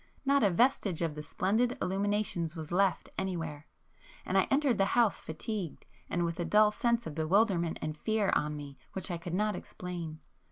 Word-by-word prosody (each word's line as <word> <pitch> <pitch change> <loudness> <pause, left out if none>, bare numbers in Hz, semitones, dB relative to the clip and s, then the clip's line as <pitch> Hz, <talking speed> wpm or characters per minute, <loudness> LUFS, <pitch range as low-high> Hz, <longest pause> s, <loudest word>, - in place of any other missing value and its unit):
Not 280 0 +4
a 205 - +5
vestige 195 - +2
of 165 -2 -1
the 150 - -6
splendid 220 - 0
illuminations 195 -4 0
was 160 -1 -7
left 190 +2 +2
anywhere,—and 165 - -6
I - - +4
entered 275 -6 +2
the 195 +4 +2
house 230 -4 +3
fatigued, 175 +2 -5 0.2
and 175 0 0
with 170 0 -3
a - - +1
dull 210 +5 +5
sense 235 +1 +1
of 155 - -5
bewilderment 170 +1 +2
and 155 0 -2
fear 215 +4 +1
on 150 0 0
me 140 -2 -9
which 190 0 -3
I 170 - -3
could 170 +1 -4
not 210 +2 +1
explain. 170 -3 -6
185 Hz, 175 wpm, -31 LUFS, 165-215 Hz, 0.2 s, a